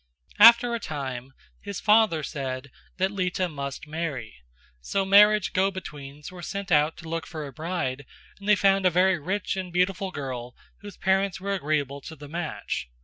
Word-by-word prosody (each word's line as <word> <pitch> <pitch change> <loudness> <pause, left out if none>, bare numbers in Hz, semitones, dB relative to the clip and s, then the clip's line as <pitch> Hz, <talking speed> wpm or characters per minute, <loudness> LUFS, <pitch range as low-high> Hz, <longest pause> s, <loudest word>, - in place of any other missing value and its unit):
After 235 +1 +8
a 235 - -1
time 135 - -5 0.3
his 200 -2 -6
father 210 -7 +4
said 135 -2 -5 0.3
that 190 +1 +1
Lita 185 -2 -1
must 140 -3 -6
marry; 150 -8 -4 0.5
so 190 - -1
marriage 210 +1 +5
go 190 +1 +3
betweens 145 -6 -9
were 180 -1 -10
sent 200 +1 -5
out 150 0 +3
to 165 - -10
look 165 0 -4
for 155 -3 -6
a 140 - -9
bride 155 -5 -3 0.3
and 200 +1 -5
they 210 - +7
found 195 -1 +3
a - - +5
very 180 +1 +3
rich 190 +7 -2
and 185 -2 -5
beautiful 185 +2 0
girl 130 -6 -6 0.2
whose 205 -3 -11
parents 190 -1 +1
were 200 +1 -2
agreeable 145 -5 -1
to 160 - -9
the 145 -1 -11
match. 155 - -4
175 Hz, 175 wpm, -26 LUFS, 145-195 Hz, 0.5 s, After